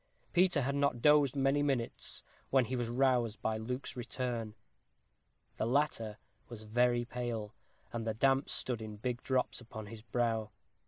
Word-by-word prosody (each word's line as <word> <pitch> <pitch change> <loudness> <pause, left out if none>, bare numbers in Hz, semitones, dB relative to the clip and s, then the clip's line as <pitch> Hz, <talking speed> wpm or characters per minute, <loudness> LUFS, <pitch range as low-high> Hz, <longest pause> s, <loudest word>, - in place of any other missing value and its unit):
Peter 175 -5 +4
had 140 +2 0
not 140 -3 +1
dozed 145 0 +5
many 135 +1 +3
minutes, 135 -5 -2 0.3
when 130 -2 +4
he 130 - -2
was 120 -2 -1
aroused 120 -3 +2
by 110 - 0
Luke's 125 +4 -4
return. 120 -3 -3 1.0
The 110 - 0
latter 115 -5 +1 0.3
was 115 -2 -8
very 120 +2 +2
pale, 120 -3 -4 0.4
and 115 -1 -3
the 110 - 0
damp 135 +3 +3
stood 120 -3 -1
in 110 -1 -6
big 120 +3 -2
drops 130 -1 0
upon 110 -2 -8
his 110 +1 -9
brow. 115 -2 0
120 Hz, 155 wpm, -33 LUFS, 115-135 Hz, 1.0 s, dozed